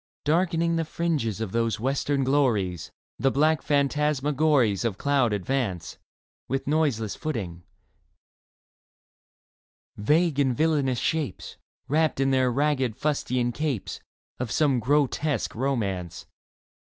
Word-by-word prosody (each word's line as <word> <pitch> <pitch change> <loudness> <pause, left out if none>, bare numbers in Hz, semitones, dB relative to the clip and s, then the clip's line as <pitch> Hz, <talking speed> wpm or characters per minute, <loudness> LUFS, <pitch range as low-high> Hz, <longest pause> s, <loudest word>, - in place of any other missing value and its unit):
Darkening 170 +1 +1
the 165 - +1
fringes 155 - -2
of 110 -4 -3
these 115 0 0
western 135 +3 0
glories 115 - 0 0.3
The 135 - +3
black 155 +3 +2
phantasmagories 145 -5 +1
Of 110 -5 -1
cloud 140 -3 +2
advance 100 -5 -2 0.5
With 135 +2 -2
noiseless 140 -8 0
footing 100 - -4 1.6
— - - -83
vague 150 +7 +2
and 130 -4 +2
villainous 145 -5 +1
shapes, 150 - -3 0.3
Wrapped 155 0 +1
in 135 0 +2
their 130 -1 +3
ragged 135 -3 0
fustian 125 -5 0
capes, 145 -5 -3 0.4
Of 125 -3 -3
some 140 +1 +2
grotesque 145 +4 0
romance. 105 -9 -2
135 Hz, 110 wpm, -26 LUFS, 115-150 Hz, 1.6 s, The